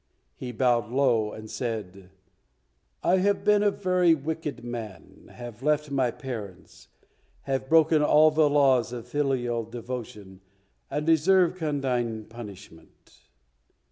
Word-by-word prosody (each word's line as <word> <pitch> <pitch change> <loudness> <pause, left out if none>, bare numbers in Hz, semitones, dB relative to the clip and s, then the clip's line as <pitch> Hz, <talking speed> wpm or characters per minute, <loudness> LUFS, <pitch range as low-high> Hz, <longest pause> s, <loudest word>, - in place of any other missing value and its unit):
He 125 - -6
bowed 120 -2 +1
low, 120 -5 +1
and 110 0 -9
said, 100 -7 -5 0.9
"I 185 - +3
have 200 +2 +1
been 210 -1 +4
a 205 - +4
very 180 -4 +2
wicked 150 -4 -5
man, 115 -7 -8
have 120 -2 -10
left 150 0 0
my 130 -3 +1
parents, 110 - -8 0.6
have 135 -1 -3
broken 160 -1 +5
all 155 +1 +5
the 155 -1 +3
laws 135 -5 +3
of 120 -1 -7
filial 125 -4 -1
devotion, 115 -4 -8 0.5
and 150 +2 -3
deserve 170 +3 +4
condign 130 - -2
punishment." 105 -7 -13
130 Hz, 120 wpm, -26 LUFS, 115-150 Hz, 0.9 s, broken